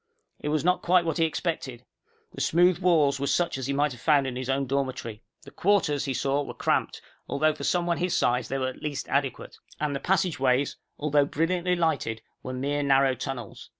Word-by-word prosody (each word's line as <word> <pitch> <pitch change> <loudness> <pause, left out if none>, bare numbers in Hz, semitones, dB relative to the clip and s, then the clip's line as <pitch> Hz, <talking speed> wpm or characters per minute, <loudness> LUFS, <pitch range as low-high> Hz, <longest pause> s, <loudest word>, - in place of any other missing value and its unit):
It 150 - -3
was 155 +1 0
not 180 0 +2
quite 180 0 +3
what 165 0 -1
he 165 - +4
expected. 145 -7 -3 0.5
The - - -6
smooth 175 +1 +3
walls 155 -7 +3
were 140 - -1
such 170 -4 0
as 130 - -4
he 140 - -1
might 145 +1 +1
have 120 -2 -10
found 145 0 +3
in 130 -2 -3
his 130 0 -4
own 135 +1 +1
dormitory. 130 -5 -3 0.2
The - - -13
quarters, 170 -8 +1
he 135 - -1
saw, 140 +3 0
were 145 - -7
cramped, - - -1 0.3
although 155 +2 +2
for 155 - -9
someone 175 -1 +1
his 180 0 0
size 125 +1 +1
they 135 - -2
were 130 -1 -1
at 130 - -11
least 145 -2 -4
adequate. 140 -2 -2 0.2
And 150 -2 -1
the - - -2
passageways, 140 -8 +1 0.2
although 145 -1 +2
brilliantly 175 +4 0
lighted, 140 -10 -1 0.2
were 130 - -6
mere 140 +3 -1
narrow 135 -1 +3
tunnels. 125 -3 -6
145 Hz, 205 wpm, -26 LUFS, 135-165 Hz, 0.5 s, he